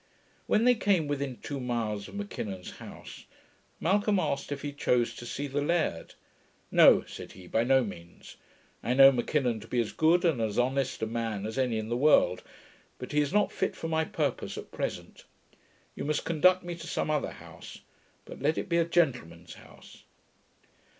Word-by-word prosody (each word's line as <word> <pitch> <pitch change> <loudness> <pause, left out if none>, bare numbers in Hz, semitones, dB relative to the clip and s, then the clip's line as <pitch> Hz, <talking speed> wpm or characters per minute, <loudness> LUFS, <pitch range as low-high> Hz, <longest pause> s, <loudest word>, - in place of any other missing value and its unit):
When 215 - +3
they 250 +1 +6
came 195 -8 +1
within 140 -3 -3
two 140 -1 -4
miles 115 -5 -3
of - - -12
M'Kinnon's 105 - -5
house, - - -11 0.5
Malcolm 205 +4 +2
asked 145 -5 -2
if 140 -1 -4
he 145 - -3
chose 125 -4 +1
to 120 - -9
see 140 +4 -4
the 145 +1 -2
laird. 155 - -1 0.6
'No,' - - +7
said - - -10
he, 95 - -13
'by 110 +6 0
no 130 0 +4
means. 85 -5 -10 0.4
I 125 - -1
know 135 0 +9
M'Kinnon 125 -2 0
to 110 - -12
be 125 - -1
as 115 - -1
good 170 +3 +3
and 155 -9 +2
as 110 -2 -2
honest 130 0 0
a - - +2
man 110 -3 -3
as 110 +4 -4
any 125 -4 +1
in 110 0 -4
the 120 - 0
world, 125 -9 +4 0.6
but 125 - -8
he 150 0 +2
is 145 -1 -1
not 210 0 +2
fit 190 - -2
for 165 - -5
my 160 0 +1
purpose 150 -4 -3
at - - -9
present. - - -5 0.7
You - - -6
must 150 +1 -1
conduct 180 +3 +3
me 175 0 -5
to - - -9
some - - -1
other 150 -2 -1
house; - - -12 0.4
but - - -11
let 150 +3 +1
it - - -3
be 170 - +2
a 170 - +3
gentleman's 125 - -1
house.' - - -16
135 Hz, 190 wpm, -29 LUFS, 115-160 Hz, 0.7 s, know